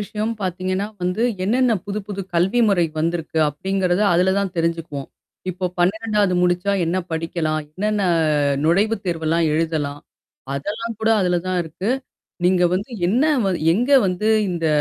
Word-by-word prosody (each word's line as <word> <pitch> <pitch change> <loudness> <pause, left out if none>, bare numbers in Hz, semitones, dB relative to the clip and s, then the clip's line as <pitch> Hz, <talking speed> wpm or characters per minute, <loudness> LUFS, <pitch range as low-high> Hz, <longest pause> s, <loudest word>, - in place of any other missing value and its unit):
விஷயம் 210 +2 -3
பாத்தீங்கன்னா 185 +2 -2 0.2
வந்து, 180 +5 0 0.2
என்னென்ன 245 +4 +2
புது 205 +1 -3
புது 200 -1 -5
கல்வி 190 +8 +2
முறை 180 -4 +3 0.2
வந்திருக்கு, 165 0 -1
அப்டிங்கிறத, 185 +4 -1
அதுல 185 +2 +3
தான் 200 -2 -1
தெரிஞ்சுக்குவோம். 165 -4 -2 0.4
இப்போ 185 +1 -5
12 210 +1 +1
முடிச்சா 180 +3 +1
என்ன 170 +3 0 0.2
படிக்கலாம்? 160 -1 -1
என்னென்ன 210 +5 -1 0.6
நுழைவு 200 +8 +3
தேர்வெல்லாம் 165 -1 0
எழுதலாம்? 155 -2 -1 0.5
அதெல்லாம் 215 +10 -4
கூட, 220 - +1
அதுல 180 -1 +2
தான் 185 -1 0
இருக்கு. 170 +6 -4 0.5
நீங்க 180 0 +4
வந்து 200 +7 -3 0.2
என்ன 240 +10 +2 0.2
வ - - +2 0.2
எங்க 240 +9 0 0.2
வந்து 185 +4 -1 0.2
இந்த 170 -2 -2
180 Hz, 140 wpm, -21 LUFS, 165-205 Hz, 0.6 s, நீங்க